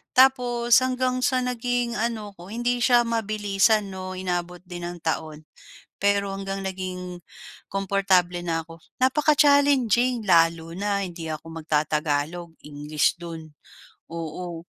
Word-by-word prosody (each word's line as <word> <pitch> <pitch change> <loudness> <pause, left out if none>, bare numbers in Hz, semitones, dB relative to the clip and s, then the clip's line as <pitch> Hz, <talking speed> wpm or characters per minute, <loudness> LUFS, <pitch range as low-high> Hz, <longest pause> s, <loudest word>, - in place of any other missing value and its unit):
tapos 245 -2 +5
hanggang 255 0 0
sa 260 -3 +2
naging 245 -1 -1
ano 220 -2 -2
'ko 175 - -11
hindi 240 +2 0
siya 240 0 +5
mabilisan, 210 -2 +1
no, 185 0 -6
inabot 180 -1 -3
din 175 -1 -7
ng 175 0 -7
taon 155 -1 -3 0.6
pero 200 0 +1
hanggang 195 0 -4
naging 185 -1 -5 0.6
komportable 190 -2 +1
na 165 -1 0
ako. 165 0 -12 0.2
Napaka-challenging 270 -4 +3
lalo 165 -1 +3
na 200 +1 -1
hindi 170 -3 -7
ako 155 +1 -7
magtatagalog, 155 +2 -1
English 150 0 0
do'n, 165 -2 -8 0.6
oo 165 +1 -6
195 Hz, 120 wpm, -25 LUFS, 170-240 Hz, 0.6 s, tapos